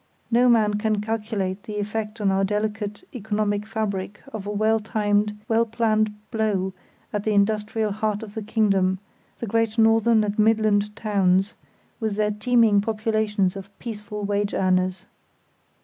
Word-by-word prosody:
No 245 Hz, +2 st, +5 dB
man 210 Hz, -3 st, +3 dB
can 215 Hz, -1 st, +1 dB
calculate 210 Hz, -3 st, -2 dB
the 210 Hz, 0 st, -6 dB
effect 215 Hz, +1 st, -3 dB
on 200 Hz, -2 st, +2 dB
our 190 Hz, 0 st, +1 dB
delicate 210 Hz, -, -2 dB
economic 210 Hz, -2 st, -1 dB
fabric 205 Hz, -2 st, -3 dB
of 205 Hz, -2 st, -5 dB
a -, -, -2 dB
well 215 Hz, +2 st, +2 dB
timed, 210 Hz, -1 st, 0 dB
well 225 Hz, 0 st, +3 dB
planned 220 Hz, -1 st, +1 dB, 0.2 s
blow 200 Hz, -4 st, 0 dB, 0.4 s
at 205 Hz, -1 st, -1 dB
the 215 Hz, -1 st, +1 dB
industrial 210 Hz, +1 st, +1 dB
heart 215 Hz, +1 st, -2 dB
of 210 Hz, -2 st, -9 dB
the 220 Hz, -, -4 dB
kingdom, 200 Hz, -4 st, +2 dB, 0.4 s
the -, -, -4 dB
great 225 Hz, +1 st, 0 dB
northern 225 Hz, 0 st, +4 dB
and 210 Hz, 0 st, -2 dB
midland 210 Hz, -1 st, +2 dB
towns, 195 Hz, -2 st, +1 dB, 0.5 s
with 220 Hz, -3 st, -1 dB
their 210 Hz, 0 st, +1 dB
teeming 215 Hz, -1 st, +3 dB
populations 215 Hz, -3 st, 0 dB
of 195 Hz, 0 st, -8 dB
peaceful 210 Hz, -2 st, -6 dB
wage 205 Hz, 0 st, -1 dB
earners. 185 Hz, 0 st, +1 dB
210 Hz, 150 wpm, -24 LUFS, 205-220 Hz, 0.5 s, No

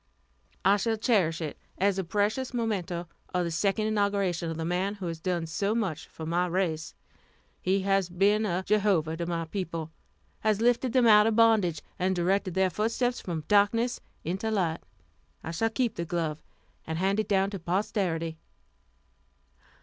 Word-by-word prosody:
"I 200 Hz, +1 st, +6 dB
shall 225 Hz, +2 st, 0 dB
cherish 190 Hz, -8 st, +2 dB
it 155 Hz, -2 st, -5 dB, 0.2 s
as 195 Hz, 0 st, +2 dB
a -, -, 0 dB
precious 210 Hz, +8 st, -1 dB
memento 185 Hz, -7 st, -2 dB, 0.3 s
of 180 Hz, -, +2 dB
the 170 Hz, -, -2 dB
second 200 Hz, +5 st, +1 dB
inauguration 200 Hz, -5 st, 0 dB
of 165 Hz, -, -4 dB
the 160 Hz, -, -3 dB
man 185 Hz, +4 st, -1 dB
who 195 Hz, -3 st, -7 dB
has 165 Hz, -2 st, -4 dB
done 175 Hz, -1 st, -1 dB
so 200 Hz, +6 st, -1 dB
much 190 Hz, -9 st, -2 dB
for 160 Hz, -, -8 dB
my 175 Hz, +3 st, +1 dB
race. 170 Hz, -3 st, -1 dB, 0.7 s
He 190 Hz, +2 st, +1 dB
has 195 Hz, -1 st, +1 dB
been 200 Hz, +4 st, +3 dB
a 185 Hz, -3 st, -1 dB
Jehovah 195 Hz, -7 st, +2 dB
to 170 Hz, 0 st, -3 dB
my 165 Hz, -1 st, -2 dB
people 165 Hz, -3 st, -4 dB, 0.5 s
has 215 Hz, -2 st, +1 dB
lifted 240 Hz, +1 st, +2 dB
them 255 Hz, -2 st, +4 dB
out 210 Hz, -1 st, +7 dB
of 225 Hz, -, +1 dB
bondage, 215 Hz, -9 st, +3 dB, 0.2 s
and 185 Hz, +1 st, +1 dB
directed 185 Hz, +1 st, 0 dB
their 190 Hz, -1 st, +2 dB
footsteps 230 Hz, +6 st, 0 dB
from 165 Hz, -4 st, -4 dB
darkness 230 Hz, +4 st, +3 dB, 0.2 s
into 190 Hz, +7 st, -2 dB
light. 175 Hz, -6 st, 0 dB, 0.6 s
I 160 Hz, -, -4 dB
shall 200 Hz, +7 st, 0 dB
keep 240 Hz, 0 st, 0 dB
the 170 Hz, -, -3 dB
glove, 160 Hz, -2 st, -2 dB, 0.5 s
and 160 Hz, 0 st, -2 dB
hand 195 Hz, +4 st, +1 dB
it 215 Hz, -, 0 dB
down 195 Hz, -1 st, +2 dB
to 195 Hz, -, -5 dB
posterity." 170 Hz, -3 st, -1 dB
190 Hz, 170 wpm, -28 LUFS, 170-210 Hz, 0.7 s, out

